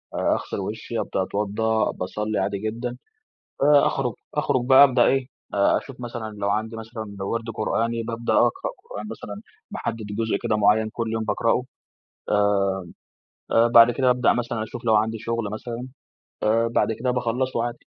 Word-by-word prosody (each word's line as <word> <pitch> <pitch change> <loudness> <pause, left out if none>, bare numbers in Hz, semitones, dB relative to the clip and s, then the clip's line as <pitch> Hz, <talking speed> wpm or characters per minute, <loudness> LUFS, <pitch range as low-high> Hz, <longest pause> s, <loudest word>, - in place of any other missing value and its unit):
أغسل - - -1
وشي، 110 +3 -4
أبدأ 95 - -1
أتوضى، 105 +3 0
باصلي 105 +3 -2
عادي 100 - -1
جدًا. 120 +4 -4 0.7
آآ، 145 0 +6
أخرج 125 -4 0 0.2
أخرج 145 -4 +1
بقى 135 +1 +9
أبدأ 125 -3 +4
إيه، 135 -1 +2 0.3
أ 100 0 +3
أشوف 135 -2 -6
مثلًا 120 -2 -5
لو 100 - 0
عندي 110 +2 -1
مثلًا 110 -2 -7
وِرد 115 +3 -2
قرآني 115 +1 -1
بابدأ 115 +1 -2
أقرأ 380 - +2 0.2
قرآن - - -6
مثلًا، - - -7 0.4
باحدد 115 -2 -4
جزء 115 -2 +1
كده 115 -3 +1
معين 105 +1 +3
كل 115 -1 -3
يوم 110 0 -1
باقرأه. 115 +3 +1 0.7
آآ، 100 -1 +3 0.9
آآ، 115 +1 +5
بعد 120 0 +8
كده 130 +1 +2
أبدأ 125 0 +3
مثلًا 120 -2 -2
أشوف 115 +2 -7
لو 110 -2 +4
عندي 110 +1 +1
شغل 115 0 -2
مثلًا، 120 +3 -6 0.5
آآ، 115 +2 +3
بعد 115 - +1
كده 125 +3 -1
باخلصه 125 0 -1
عادي. 120 0 -6
115 Hz, 160 wpm, -24 LUFS, 110-120 Hz, 0.9 s, بقى